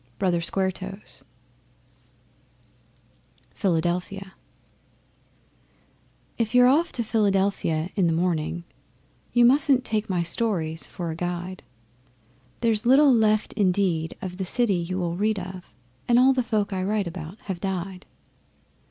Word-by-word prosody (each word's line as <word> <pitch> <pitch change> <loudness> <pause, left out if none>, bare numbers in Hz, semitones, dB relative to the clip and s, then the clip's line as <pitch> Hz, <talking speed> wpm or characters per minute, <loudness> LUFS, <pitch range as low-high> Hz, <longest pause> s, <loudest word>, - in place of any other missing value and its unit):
BROTHER 175 +2 +1
SQUARE 190 +3 +1
TOES 195 +2 -9 2.3
Philadelphia 180 +1 -2 2.1
If 230 +1 -1
you're 250 0 +7
off 310 +7 +3
to 235 - 0
Philadelphia 195 -6 0
in 190 -5 +2
the 165 - +1
morning, 170 0 -1 0.7
You 240 0 +5
mustn't 265 0 +3
take 215 -1 -1
my 180 -2 0
stories 170 -4 -1
for 170 -2 -5
a - - -5
guide. 175 +2 -4 1.0
There's 225 -3 +2
little 275 +2 +6
left 215 -2 +2
indeed 180 -5 0
of 180 -1 -5
the 190 - -2
city 230 +3 +1
you 180 +1 -2
will 170 -2 -2
read 215 +2 +1
of, 185 -1 -8 0.4
And 240 - +4
all 260 +2 +6
the 260 - +1
folk 210 -4 -1
I 185 - -2
write 205 +1 0
about 170 +2 -7
have 190 -3 -5
died. 190 0 -4
190 Hz, 125 wpm, -25 LUFS, 175-220 Hz, 2.3 s, you're